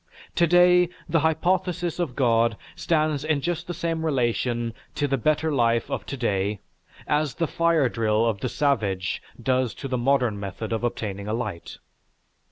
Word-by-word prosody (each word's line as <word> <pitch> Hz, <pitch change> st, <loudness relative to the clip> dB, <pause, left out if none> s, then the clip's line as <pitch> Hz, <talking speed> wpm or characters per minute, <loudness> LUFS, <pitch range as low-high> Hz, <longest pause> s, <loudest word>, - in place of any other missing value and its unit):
To 170 Hz, -, +3 dB
day, 180 Hz, 0 st, +5 dB, 0.2 s
the 165 Hz, 0 st, +2 dB
hypothesis 175 Hz, +2 st, 0 dB
of 155 Hz, -8 st, -2 dB
God 115 Hz, -4 st, +2 dB, 0.2 s
stands 155 Hz, -3 st, 0 dB
in 155 Hz, -2 st, +1 dB
just 170 Hz, +2 st, -3 dB
the 175 Hz, -, -3 dB
same 165 Hz, -1 st, -2 dB
relation 120 Hz, -4 st, 0 dB, 0.2 s
to 145 Hz, -, 0 dB
the 135 Hz, -, +1 dB
better 155 Hz, +4 st, +1 dB
life 115 Hz, -3 st, +1 dB
of -, -, -3 dB
to 140 Hz, -, -4 dB
day 100 Hz, -3 st, -1 dB, 0.5 s
as 150 Hz, -2 st, 0 dB
the 165 Hz, -, 0 dB
fire 165 Hz, -3 st, +2 dB
drill 110 Hz, -1 st, +1 dB
of 110 Hz, -4 st, 0 dB
the 125 Hz, -, -2 dB
savage 105 Hz, -12 st, 0 dB, 0.2 s
does 130 Hz, -2 st, 0 dB
to 135 Hz, -, -6 dB
the 125 Hz, -2 st, -1 dB
modern 125 Hz, -4 st, +2 dB
method 100 Hz, +3 st, -5 dB
of 115 Hz, -, -2 dB
obtaining 100 Hz, -4 st, -3 dB
a 110 Hz, -, -1 dB
light. 100 Hz, -8 st, -5 dB
135 Hz, 170 wpm, -25 LUFS, 115-160 Hz, 0.5 s, day